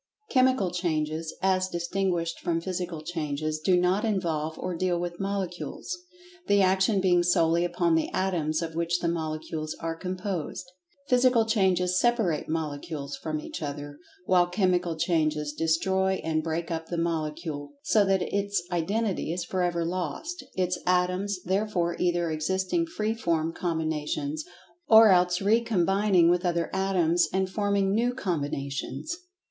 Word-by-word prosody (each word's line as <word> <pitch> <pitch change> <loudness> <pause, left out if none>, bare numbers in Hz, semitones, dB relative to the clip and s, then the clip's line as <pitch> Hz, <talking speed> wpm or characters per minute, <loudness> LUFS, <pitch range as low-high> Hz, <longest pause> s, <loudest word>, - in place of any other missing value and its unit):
Chemical 255 -8 +3
Changes, 160 -2 -1
as 185 -1 +2
distinguished 175 -1 -1
from 165 -1 0
Physical 175 -2 -4
Changes, 155 -2 -3
do 180 +3 +3
not 180 +3 +2
involve 165 -7 -1
or 185 - -3
deal 175 0 0
with 175 0 -4
Molecules, 195 - -3 0.5
the 200 0 +4
action 190 +2 +3
being 180 -2 +4
solely 170 -1 +3
upon 175 -1 +1
the 160 -1 +1
Atoms 165 -4 0
of 165 -1 -5
which 170 +1 0
the 170 - -1
Molecules 155 -1 -3
are 165 0 -3
composed. 185 -1 -4 0.4
Physical 250 -2 +4
Changes 185 -4 +2
separate 225 -13 +1
Molecules 150 -2 -3
from 155 -1 -4
each - - -7
other, 145 0 -6 0.3
while 180 -1 +4
Chemical 180 -2 +1
Changes 155 -3 0
destroy 190 +5 +1
and 155 -1 0
break 165 +1 -3
up 160 0 -3
the 175 - -3
Molecule, 155 -3 -3
so 215 - +4
that 195 -2 +2
its 200 -2 -1
identity 190 +2 -1
is 175 +1 -3
forever 175 -2 0
lost, 185 - -4
its 180 -1 0
Atoms 180 +2 +1
thereafter 185 -2 0
either 175 -2 +1
existing 190 - 0
free 220 -9 -1
from 165 -7 -1
combinations, 155 -3 -2 0.4
or 220 0 +8
else 180 -1 +4
recombining 200 -4 +3
with 175 +1 +3
other 170 -2 0
Atoms, 180 -3 +2
and 190 0 +1
forming 200 0 +1
new 240 +3 +1
combinations. 145 - -3
175 Hz, 140 wpm, -27 LUFS, 160-190 Hz, 0.5 s, or